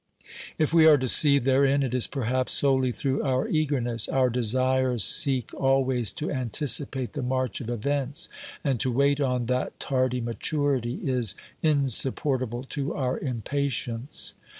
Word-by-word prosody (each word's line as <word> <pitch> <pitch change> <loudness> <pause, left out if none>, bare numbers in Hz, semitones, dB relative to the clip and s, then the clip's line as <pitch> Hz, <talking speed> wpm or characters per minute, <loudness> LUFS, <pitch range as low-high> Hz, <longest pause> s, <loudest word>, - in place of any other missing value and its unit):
If 155 0 0
we 160 -1 +6
are 155 -2 +7
deceived 140 +1 +4
therein, 135 +1 +2
it 125 -2 -3
is 125 -2 +3
perhaps 130 -1 -1
solely 130 -2 +3
through 135 +2 -2
our 130 -2 -1
eagerness. 130 -8 -1
Our 130 -2 +1
desires 130 +1 +1
seek 135 -7 +2
always 130 -5 +1
to 150 - -4
anticipate 130 0 0
the 145 - -4
march 130 -3 -2
of 120 - -7
events, 140 +4 -2 0.4
and 135 -4 -1
to 130 - +1
wait 140 +3 +1
on 125 -3 -1
that 125 +1 -3
tardy 130 -2 -1
maturity 125 +1 -2
is 125 -6 -1 0.3
insupportable 130 -3 +1
to 140 -1 -3
our 130 -3 -2
impatience. 130 0 -3
130 Hz, 140 wpm, -25 LUFS, 125-140 Hz, 0.4 s, are